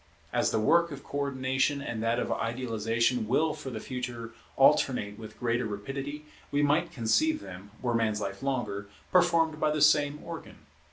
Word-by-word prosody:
As - - +2
the - - +1
work 170 +10 +4
of 140 -1 -8
Co 145 - -4
ordination 130 0 0
and 120 -5 -4
that 115 +1 +1
of - - -1
Idealization 115 0 0
will 150 +6 +2
for 135 - -7
the 115 -4 -5
future 120 -2 -5 0.2
alternate 125 -6 +3
with 110 -1 -10
greater 120 0 0
rapidity, 135 +8 -5 0.2
we 145 +1 +1
might 150 +4 +2
conceive 305 - +2
them, 95 - -10
were 120 -1 +1
man's 110 -2 +1
life 100 -1 -4
longer, 105 -7 -2 0.2
performed 170 -3 +3
by 155 - +2
the 150 0 0
same 150 0 +4
organ. 170 -1 -9
130 Hz, 170 wpm, -29 LUFS, 115-145 Hz, 0.2 s, work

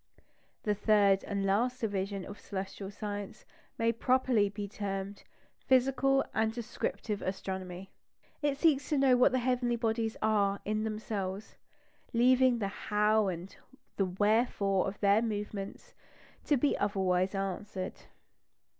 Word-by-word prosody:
The 210 - +1
third 205 -2 +3
and 200 -1 -2
last 240 +6 +1
division 200 -3 -2
of 205 - -9
celestial 195 0 -6
science 205 +1 -6 0.3
may 230 0 +2
properly 245 -3 +2
be 205 0 -5
termed 200 0 -5 0.4
"physical 270 +1 +3
and 220 0 +1
descriptive 220 -2 -4
astronomy." 190 -1 -5 0.5
It 290 -2 0
seeks 285 -4 +2
to 300 - +1
know 270 -2 +5
what 250 +2 +5
the 255 - +1
heavenly 250 -1 +1
bodies 225 -1 -1
are 200 -2 +2
in 215 +1 -1
themselves, 210 -2 -4 0.6
leaving 250 +1 +4
the 205 -3 -1 0.2
How? 210 0 +3
and 180 +1 -5 0.4
the 195 - +2
Wherefore? 200 0 +1
of 195 +1 -5
their 200 +1 +4
movements 205 -3 -5 0.5
to 290 - +3
be 285 +3 +2
otherwise 190 -2 +1
answered. 195 0 -3
210 Hz, 130 wpm, -31 LUFS, 195-235 Hz, 0.6 s, know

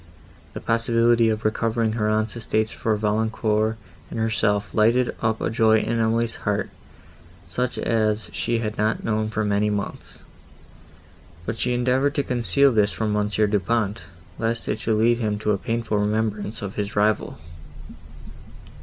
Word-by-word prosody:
The - - -5
possibility 115 0 +3
of 110 0 -2
recovering 115 +1 +1
her 110 -1 0
aunt's 110 +1 0
estates 110 -1 -1
for 110 -1 -1
Valancourt 110 +1 0 0.3
and - - -5
herself 105 -2 0
lighted 115 +3 +3
up 110 -1 0
a - - -1
joy 110 -1 +4
in 115 +1 -1
Emily's 115 +1 +1
heart, 105 -1 -2 0.8
such 125 0 -2
as 110 -3 0
she 95 +6 0
had 110 -2 -3
not 110 +1 0
known 110 -1 0
for 110 0 -1
many 105 0 +1
months; 105 -1 -5 1.2
but 110 0 -4
she 125 0 +1
endeavoured 130 +4 +1
to 140 - +1
conceal 125 +2 +2
this 105 -3 +2
from 110 -2 -2
Monsieur 105 +1 +1
Du 105 0 +1
Pont, 110 0 -1 0.4
lest 115 +1 -2
it 105 - -1
should 110 - 0
lead 115 +2 +3
him 105 -3 -1
to 105 0 0
a 100 - +1
painful 115 -1 -1
remembrance 105 0 -1
of 100 -1 -4
his 105 0 -4
rival. 105 0 +1
110 Hz, 155 wpm, -23 LUFS, 105-115 Hz, 1.2 s, joy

